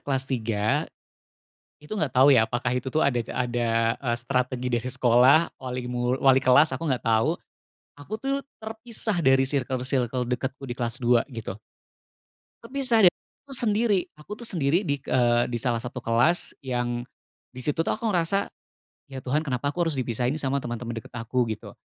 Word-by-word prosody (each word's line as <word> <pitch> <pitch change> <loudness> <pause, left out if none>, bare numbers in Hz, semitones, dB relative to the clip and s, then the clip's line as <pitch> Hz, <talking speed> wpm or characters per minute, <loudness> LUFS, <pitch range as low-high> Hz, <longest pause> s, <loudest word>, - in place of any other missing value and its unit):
kelas 135 -2 -1
3, 110 -5 -1 0.9
itu 150 +9 -7
nggak 155 -9 -1
tau, 130 +3 +6
ya, 125 -6 +6
apakah 120 +1 -2
itu, 130 +1 -4
tuh, 155 - +2
ada 140 -4 +2 0.2
ada, 115 -2 0
eee, 120 -3 -2
strategi 125 0 -1
dari 120 -1 -1
sekolah, 130 +5 +4
wali 125 -1 -5
mu 125 0 -1
wali 135 -1 +4
kelas 130 +5 +5
aku 165 - -6
nggak 125 - -3
tau 115 +10 +2 0.6
aku, 145 +9 -9
tuh, 275 +5 -2 0.2
terpisah 220 -3 -2
dari 135 -3 +4
sirkel-sirkel 130 -2 -1
dekatku 130 +2 -3
di - - -2
kelas 120 -2 -1
2, 120 0 +3
gitu. 110 -6 -7 1.0
Terpisah 255 -1 +1
dan 175 - +8 0.3
aku 280 - -13
sendiri. 215 -3 +2 0.2
Aku, 150 +6 -18
tuh, 235 - -4
sendiri 165 -1 +1
di 145 - +1
k - - -27
eee, 120 -1 +3
di 120 - -1
salah 120 -3 0
satu 125 +1 -6
kelas 120 +10 +1
yang 120 -1 -2 0.5
di 130 - -9
situ, 150 +4 -1
tuh, - - 0
aku 225 +1 -2
ngerasa, 190 +1 0 0.6
"Ya, 135 - -6
Tuhan, 145 +4 0
kenapa 135 +2 -1
aku 175 +1 -1
harus 155 -4 -1
dipisahin 125 +2 -1
sama 140 -1 0
teman-teman 120 0 -5
dekat 130 +3 -12
aku?" 120 +1 -1
Gitu. 110 -1 -6
130 Hz, 175 wpm, -25 LUFS, 120-155 Hz, 1.0 s, dan